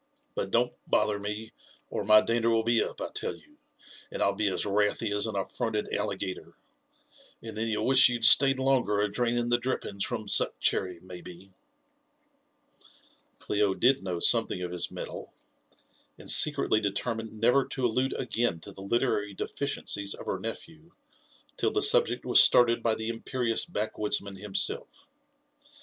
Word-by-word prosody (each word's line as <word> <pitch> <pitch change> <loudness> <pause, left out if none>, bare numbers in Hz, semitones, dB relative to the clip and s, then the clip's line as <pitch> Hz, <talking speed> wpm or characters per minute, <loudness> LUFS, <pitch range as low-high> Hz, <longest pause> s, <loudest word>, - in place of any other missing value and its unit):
But - - -3
don*t - - +1 0.2
boliier 105 -1 +1
me, 105 +2 -5 0.4
or - - -3
my 110 +1 +6
dander 115 0 0
will 115 -1 +2
be 115 0 +2
up, - - -7
I - - -4
tell - - -4
you, - - -21 0.5
and - - -2
I'll 100 - +2
be 105 +1 -1
as 95 - -1
wrathy 105 +2 0
as 105 +2 +1
an 110 - -5
atTronted 105 +2 -3
alligator; 95 - -5 0.9
and 115 -1 -8
then 110 +1 -2
you'll 110 -1 -1
wish 130 0 +6
you'd 120 -2 0
stayed 135 +3 +7
longer 130 -6 +1
a 105 0 0
draining 120 +1 -1
the 120 0 +2
drippings 120 -5 -3
from 110 -4 -4
Suc - - +1
chcrry, 90 -3 0
maybe." 90 +1 -12 1.9
Clio 105 -2 0
did 130 +2 +3
know 90 -3 -4
something 90 - +2
of 90 - -5
his 90 -1 -3
metal, - - -8 0.8
and - - -3
secretly 140 -7 +3
determined 110 +2 -3
never 125 +5 +3
to 130 - -2
allude 125 +3 0
again 120 -8 -1
to 100 - -10
the 95 - -12
literary 105 -1 -1
deficiences 100 -8 -3
of - - -11
her 95 - -3
nephew 160 - -8 0.7
till - - +1
the 415 - -1
subject 470 +3 +3
was - - +7
started 120 -1 +5
by 115 -1 +1
the 110 +1 -4
imperious 115 0 -2
back 110 -11 -4
woodsman 100 -2 -2
himself. 100 0 -2
110 Hz, 160 wpm, -28 LUFS, 100-120 Hz, 1.9 s, stayed